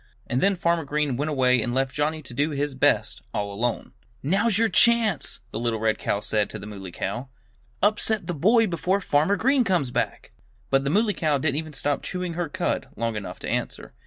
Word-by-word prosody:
And 125 - -1
then 200 0 +3
Farmer 170 -1 +1
Green 145 -2 -1
went 145 +5 -1
away 125 -4 +3
and 120 +2 -2
left 135 0 0
Johnnie 155 +1 -1
to 130 - -11
do 145 +5 +1
his 145 -1 -2
best 130 - +1
all 100 -1 -2
alone. 115 +3 -2 0.3
"Now's 195 +8 +2
your 230 +1 +4
chance!" 225 - +3
the 110 - -4
little 115 -1 -1
red 110 0 +1
cow 100 - -1
said 105 0 0
to - - -7
the 100 - -9
Muley 100 -3 -8
Cow. 120 +9 -4 0.5
"Upset 215 0 +2
the 175 - -3
boy 220 - +4
before 185 +1 0
Farmer 160 +1 +2
Green 265 +5 +3
comes 175 - 0
back!" - - -2 0.4
But 135 0 +3
the 140 - -1
Muley 210 +6 +2
Cow 155 -6 +1
didn't 145 +1 0
even 155 -1 -4
stop 145 +1 -1
chewing 180 -2 -4
her 170 -1 -3
cud - - -2
long 115 0 -1
enough 105 -2 -6
to - - -5
answer. - - -3
145 Hz, 210 wpm, -25 LUFS, 120-185 Hz, 0.5 s, your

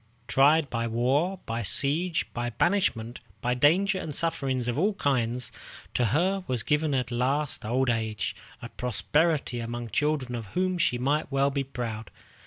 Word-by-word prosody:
Tried 145 +3 +4
by 115 -1 -1
war, 140 +11 +1
by 115 +1 -2
siege, 150 - +1
by 120 0 -2
banishment, 120 - 0 0.2
by 125 +1 0
danger 185 +10 +3
and 150 -5 -5
sufferings 135 -7 -1
of 120 +3 -1
all 200 +4 +2
kinds, 125 - 0 0.4
to 125 - +2
her 180 - +1
was 125 -4 -1
given 150 -1 +1
at 125 -2 -1
last 135 +3 0
an 110 - -5
old 130 +1 +2
age 110 -2 -2 0.3
of - - -9
prosperity 135 +2 +1
among 120 0 -5
children 145 -1 0
of 115 -3 -5
whom 185 -1 +1
she 125 - +2
might 145 +4 0
well 140 +1 +2
be 140 0 -1
proud. 115 -5 -5
135 Hz, 165 wpm, -27 LUFS, 120-155 Hz, 0.4 s, Tried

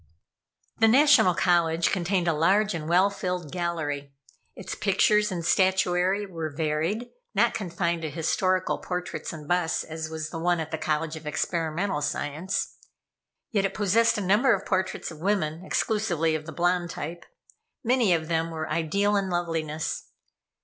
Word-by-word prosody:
The 225 - +6
National 255 - +6
College 170 -2 +2
contained 180 -1 0
a 165 - +3
large 195 +7 +2
and 160 -2 -4
well 185 +4 +4
filled 180 -6 -4
gallery. 150 -6 -3 0.4
Its 190 - -6
pictures 210 +1 +2
and 170 -3 -3
statuary 185 +1 +2
were 165 -5 -5
varied, 160 +9 -2 0.2
not - - +3
confined 170 -4 -2
to 160 - -3
historical 185 +4 0
portraits 180 0 -4
and 155 -3 -9
busts 175 -1 +1
as 160 0 -6
was 160 0 -5
the 165 - -5
one 175 +1 +1
at 160 -1 -4
the 160 - -3
College 155 +1 -1
of 155 -1 -9
Experimental 165 +3 -1
Science. 150 +5 -2 0.7
Yet 205 -4 +1
it 195 - -1
possessed 215 +3 +3
a - - -1
number 210 +6 +4
of 195 - -7
portraits 185 -2 -1
of 155 - -11
women 170 -3 -1
exclusively 190 -6 0
of 155 0 -3
the - - -5
blonde 175 +2 0
type. 170 +2 -6 0.6
Many 240 -4 +3
of 160 -2 +1
them 165 0 0
were 160 -1 -4
ideal 170 +6 +1
in 195 -1 0
loveliness. 165 -3 -2
175 Hz, 155 wpm, -26 LUFS, 160-195 Hz, 0.7 s, The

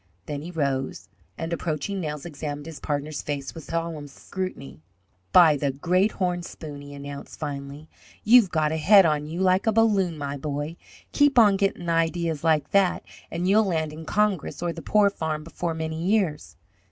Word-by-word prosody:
Then 145 -1 -4
he 165 - -7
rose, 140 -6 -2 0.3
and, 165 +1 -3
approaching 170 +4 -3
Nels, 150 -3 -5
examined 145 -2 -6
his 160 -2 -8
partner's 145 0 -3
face 140 -2 -4
with 165 -3 -10
solemn 165 -3 -3
scrutiny. 140 - -7 0.5
"By 165 -5 +7
the 140 0 0
great 180 +9 +1
horn 180 -2 -1
spoon," 150 -4 -9
he 145 0 -10
announced, 140 0 -8
finally, 145 0 -6 0.4
"you've 230 -2 +6
got 155 -3 +1
a 160 - -1
head 195 +4 +7
on 150 -2 +1
you 170 +4 -4
like 185 +2 +2
a - - +5
balloon, 200 -6 +2
my 140 -1 -4
boy! 145 +3 -4 0.4
Keep 290 -2 +3
on 210 -4 +7
gettin' 195 -3 -1
ideas 165 -2 0
like 155 -3 +2
that, 195 -2 +3 0.3
and 175 +2 -2
you'll 210 +3 +4
land 160 -5 -1
in 160 +1 -9
Congress 205 -3 0
or 170 -1 -1
the 165 - -8
poor 205 +1 +3
farm 155 -4 -3
before 165 +1 -4
many 160 0 -4
years!" 190 -6 0
160 Hz, 175 wpm, -25 LUFS, 150-185 Hz, 0.5 s, By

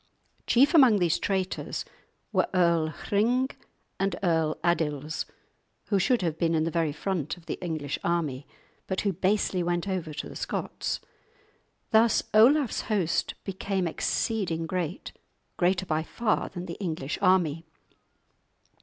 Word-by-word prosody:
Chief 275 +7 +5
among 260 -10 +7
these 175 -4 +2
traitors 190 -1 -2 0.5
were - - +2
Earl 170 -3 +3
Hring 235 - 0 0.5
and 195 -2 0
Earl 160 -3 +1
Adils, 155 -3 0 0.6
who 200 - +3
should 235 +2 +2
have 165 -2 -1
been 165 -1 +2
in 155 - +2
the 165 - -1
very 165 -2 +1
front 165 +1 -3
of 170 - -17
the - - -5
English 155 -5 -3
army, 155 -6 -1 0.4
but 190 - -1
who 200 -2 0
basely 190 +1 +1
went 175 +1 -1
over 185 -5 -2
to 150 - -5
the - - -10
Scots. - - -3 0.9
Thus 225 +1 +4
Olaf's 255 +5 +5
host 190 -7 0
became 190 -1 -2
exceeding 165 -1 -1
great, 175 0 -3 0.4
greater 185 +1 +1
by 155 -2 0
far 215 +7 -1
than 175 -1 -6
the 170 - -7
English 160 -5 -3
army. 175 -5 +3
175 Hz, 135 wpm, -27 LUFS, 160-200 Hz, 0.9 s, among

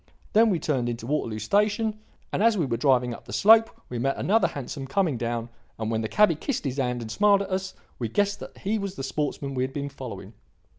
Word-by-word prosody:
Then 225 +1 +6
we 185 - +2
turned 130 -7 -1
into 115 -1 -5
Waterloo 120 -5 -1
Station, 210 - +1 0.3
and, - - 0
as 225 -1 +4
we 170 - +1
were 120 -3 -1
driving 125 -1 +2
up - - -11
the - - -10
slope 225 +2 +6 0.2
we 120 - -4
met 135 +3 0
another 220 +4 +3
hansom 135 0 -6
coming 165 0 +1
down; 115 0 -3 0.3
and 110 0 -3
when 110 0 0
the 110 - -3
cabby 210 -4 +5
kissed 225 - -3
his 135 0 -2
hand 125 -3 -1
and 110 - -7
smiled 200 - +4
at 195 - -9
us, 190 0 -2 0.2
we 120 - -1
guessed 205 - +1
that - - -10
he 210 +2 -1
was 195 -1 -4
the 135 - -5
sportsman 140 0 -2
we 130 - -1
had 130 +1 -3
been 140 0 -3
following. 125 -6 -8
140 Hz, 235 wpm, -26 LUFS, 120-200 Hz, 0.3 s, Then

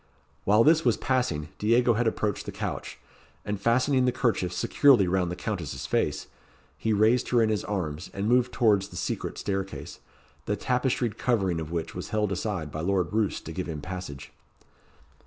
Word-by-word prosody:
While 105 +3 +5
this 160 +3 +5
was 120 -3 +3
passing, 105 - -1
Diego 120 +3 +3
had 115 +1 +1
approached 105 -2 -1
the - - -3
couch; - - -5 0.5
and 105 -1 -3
fastening 125 +3 +3
the 125 - +3
kerchief 115 -8 0
securely 125 0 +4
round 90 -1 +1
the 90 - -3
Countess's 90 - -4
face, - - 0 0.5
he 110 - -1
raised 110 +4 +3
her 120 - +3
in 110 -1 +3
his 105 -1 0
arms, 80 -7 -3
and 100 +1 -3
moved 125 +1 +3
towards 105 -5 +3
the - - -13
secret - - -3
staircase, 95 -1 -4 0.5
the 105 - +1
tapestried 125 -1 -1
covering 95 -9 +1
of 80 -1 -5
which 85 -1 -3
was 90 - -6
held 105 -2 0
aside 90 -5 -3
by 75 - -4
Lord 95 +1 0
Roos 110 -2 +1
to 80 - -8
give 90 +3 -4
him 80 -2 -4
passage. 90 -4 -7
105 Hz, 175 wpm, -27 LUFS, 90-120 Hz, 0.5 s, While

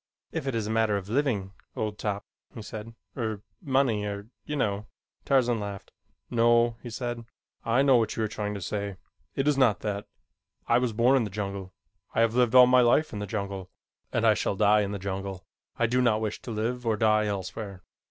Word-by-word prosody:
"If 135 - -3
it 135 - -1
is 110 -2 -1
a 110 - -2
matter 110 -2 +2
of 100 0 -7
living, 115 -7 0 0.2
old 105 -1 -3
top," 100 -1 -2 0.3
he 115 - -7
said, 110 +1 -8 0.2
"er 110 -5 -3 0.2
money, 130 -6 +2
er 100 +1 -5 0.2
you 150 - -3
know 105 -5 -1 0.2
" - - -47
Tarzan 125 -4 +3
laughed. 100 -2 -6 0.4
"No," 120 0 +4
he 120 - -7
said. 120 0 -4 0.4
"I 120 +4 +3
know 135 -3 +6
what 115 -2 0
you 110 - -1
are - - +1
trying 105 -1 -4
to 100 - -5
say. 100 0 -3 0.4
It 135 +1 0
is 145 -2 +3
not 120 -6 +4
that. 100 -1 -3 0.6
I - - +4
was 125 -2 0
born 120 +5 +4
in 125 - +2
the 105 - -3
jungle. 100 -1 -5 0.4
I - - +3
have 115 -1 +3
lived 125 -1 +3
all 125 0 +10
my 125 0 +5
life 125 +5 +3
in 105 - -4
the 105 - -4
jungle, 100 -3 -4 0.4
and - - +1
I - - +7
shall - - -1
die 105 +1 +4
in 100 -1 -2
the 100 - -3
jungle. 95 -1 -5 0.3
I 120 - +2
do 125 +2 +2
not 115 -3 +3
wish 110 -1 -3
to - - -9
live 115 +3 -2
or 115 -2 +1
die 110 0 +3
elsewhere." 95 -1 -5
110 Hz, 215 wpm, -27 LUFS, 100-120 Hz, 0.6 s, all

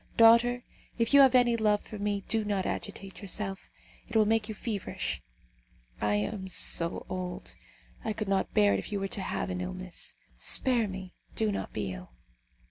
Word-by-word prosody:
Daughter, 235 +2 +6 0.3
if 230 +2 +1
you 280 - +9
have 265 -2 +7
any 245 -2 +5
love 210 -2 +2
for 215 - -8
me, 205 -1 -1
do 225 -1 +1
not 200 -2 -1
agitate 195 +1 -5
yourself, 195 -1 -4 0.4
it - - -9
will 220 -1 +6
make 220 0 +1
you 215 - -4
feverish. 210 -4 -3 0.8
I 105 0 +2
am 190 - -2
so 170 -2 0
old, 180 -1 -5 0.5
I 220 - -1
could 215 -1 -3
not 195 -1 +1
bear 100 -1 +5
it 100 - +1
if - - -6
you 205 - -1
were 195 - -1
to 195 - -4
have 190 - -2
an 180 0 -3
illness. 185 0 -5 0.2
Spare 245 -4 +2
me! 190 -1 -7 0.2
do 220 -1 +2
not 200 - -3
be 100 -3 -3
ill!" 90 -7 -10
200 Hz, 185 wpm, -30 LUFS, 185-225 Hz, 0.8 s, you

